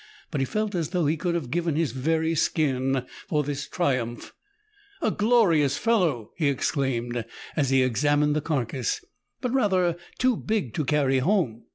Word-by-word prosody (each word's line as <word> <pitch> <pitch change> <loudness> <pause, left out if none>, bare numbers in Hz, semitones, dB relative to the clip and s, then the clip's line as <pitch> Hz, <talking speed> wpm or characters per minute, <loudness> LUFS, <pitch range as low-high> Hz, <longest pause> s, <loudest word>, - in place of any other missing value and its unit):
But 140 - -1
he - - +2
felt 215 +7 -2
as 165 -5 -1
though 180 -3 0
he 150 +3 +2
could 170 +2 -1
have 140 -8 -3
given 170 -2 0
his 160 -5 +1
very 160 +5 0
skin 135 -5 +1 0.2
for 150 -2 +1
this 145 0 -4
triumph. 125 -8 -2 0.3
* - - -39 0.3
"A - - +2
glorious 200 - +3
fellow!" 175 - +1
he 155 -4 +2
exclaimed, 120 -3 -1 0.3
as 145 -4 +1
he 135 -1 +4
examined 145 +4 +2
the 155 - +1
carcase; 130 -5 -2 0.2
" - - -53
but 250 -1 -1
rather 185 -9 +2 0.2
too 255 -1 +3
big 210 - -2
to 150 - -1
carry 135 -2 +2
home." 130 - 0
150 Hz, 175 wpm, -26 LUFS, 130-175 Hz, 0.3 s, he